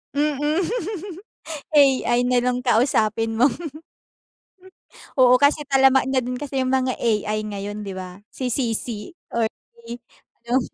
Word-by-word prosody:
Mm. 295 +3 +1 1.1
AI 270 -4 +4
na 250 -1 +3
lang 250 0 0
kausapin 225 -2 +1
mo. 260 +4 +6 0.9
Hmm, 375 -1 -22 0.5
oo, 255 -1 +6
kasi 290 +1 +3
talamak 270 -1 +4
na 260 - +3
din 250 +1 -4
kasi 270 0 -3
yung 255 0 0
mga 260 -1 +1
AI 215 -2 0
ngayon 205 +1 -5
di 190 -1 -6
ba? 185 +1 -8
Si 250 -3 -4
CicI 230 - -3 0.2
or 230 -1 +1 0.4
i 235 - -5 0.5
yung 255 +2 +3
250 Hz, 135 wpm, -22 LUFS, 225-270 Hz, 1.1 s, mo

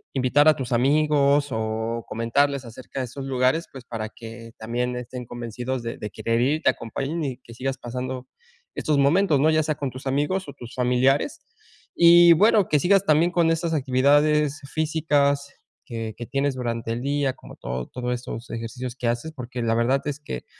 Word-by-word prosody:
invitar 135 +3 +3
a 155 - +7
tus 130 -2 -5
amigos 145 +2 +3
o 110 +1 -2
comentarles 140 +5 0
acerca 125 +3 -8
de - - -2
esos 135 +3 -8
lugares, 130 +5 +1
pues, 130 -2 -10
para 115 -3 -4
que 115 +1 -11
también 120 +2 -2
estén 125 0 -7
convencidos 120 +2 -5
de 115 - -5
de 105 - -5
querer 115 0 -1
ir, 145 +5 +1
te - - +5
acompañen 140 +8 -4
y 130 -4 -3
que 115 - -13
sigas 135 +2 -3
pasando 125 +1 -5 0.5
estos 150 -2 0
momentos, 150 +2 +3
¿no? 155 +3 +4
Ya 155 0 +3
sea 155 0 -1
con 140 -3 -4
tus 130 +2 -8
amigos 150 +7 0
o - - -8
tus 120 -1 -11
familiares 130 - +2 0.6
y 170 0 +8
bueno 210 +3 +4
que 150 - +3
sigas 195 +5 +3
también 160 +2 +3
con 170 -2 +3
esas 165 0 -1
actividades 145 +2 +2
físicas 145 -3 +1 0.3
que 115 -4 -5
que 120 - -6
tienes 140 0 0
durante 115 -2 -3
el 120 - -4
día, 140 0 0
como - - -14
todo 65 0 -5
todos 125 -1 -2
estos 120 -1 -7
ejercicios 120 +2 -5
que 125 -2 -3
haces, 120 +7 -3
porque 125 -3 -6
la 115 0 +1
verdad 125 +4 +2
es 145 -1 -3
que 65 - -6
130 Hz, 185 wpm, -24 LUFS, 120-150 Hz, 0.6 s, y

